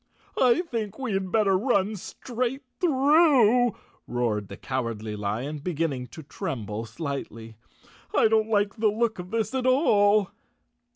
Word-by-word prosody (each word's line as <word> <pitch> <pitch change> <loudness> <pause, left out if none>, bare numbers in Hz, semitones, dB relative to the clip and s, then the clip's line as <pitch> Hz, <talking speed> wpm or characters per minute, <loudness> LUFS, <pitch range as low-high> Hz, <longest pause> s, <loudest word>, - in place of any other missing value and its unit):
I 255 +5 +5
think 220 - -4
we 260 -6 -3
had 190 -1 -2
better 205 -3 +3
run 205 -1 +1
straight 250 +6 -4 0.2
through," 270 - +4 0.3
roared 105 -5 -2
Cowardly 115 -5 -3
Lion, 110 +9 -3
beginning 145 -5 -2
to 160 +6 -11
tremble 110 -5 -5
slightly. 115 -3 -6 0.6
"I - - +5
t't 220 0 +2
like 205 0 +1
the 220 0 +2
look 220 0 0
of 180 0 -7
this 220 +1 -2
at 260 -1 0
all." 210 - +3
205 Hz, 130 wpm, -26 LUFS, -, 0.6 s, I